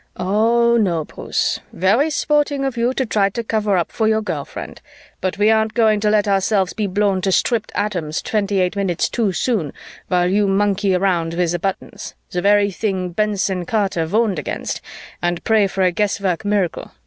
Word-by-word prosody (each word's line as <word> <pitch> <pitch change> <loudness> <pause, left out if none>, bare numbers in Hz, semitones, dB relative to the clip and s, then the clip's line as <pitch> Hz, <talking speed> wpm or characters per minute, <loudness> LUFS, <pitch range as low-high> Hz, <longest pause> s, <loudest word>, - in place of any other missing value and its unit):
"Oh, 230 +5 +2
no, 175 -8 +1
Bruce. - - -2
Very 220 - +2
sporting 295 -2 0
of 270 -2 -2
you 235 +1 +1
to 260 0 -1
try 205 -3 +1
to 230 +4 -4
cover 215 -3 0
up 170 - -1
for 220 - 0
your 220 0 +1
girl 160 -8 -3
friend, - - -9 0.4
but 185 +1 -2
we 210 +2 +4
aren't 220 0 +1
going 220 -3 +3
to 210 0 +1
let 210 0 +2
ourselves 195 -1 +1
be 210 -2 -2
blown 200 0 +1
to 190 - 0
stripped 225 +3 +1
atoms 175 -7 -2
twenty 200 -2 0
eight 180 +1 0
minutes 195 -4 0
too 225 -5 0
soon 185 - -1 0.4
while 180 -1 +2
you 200 +2 +2
monkey 195 -1 +1
with 175 -2 0
the 175 - -1
buttons, 195 +2 -5 0.2
the 180 - -1
very 205 +1 +3
thing 190 -2 -2
Benson 195 -1 -1
Carter 195 -7 0
warned 210 -1 +1
against, - - -4 0.4
and 175 -1 -1
pray 220 -3 +3
for 190 0 -1
a 180 - +3
guesswork 195 -2 -1
miracle. 205 -4 -1
200 Hz, 185 wpm, -19 LUFS, 185-220 Hz, 0.4 s, we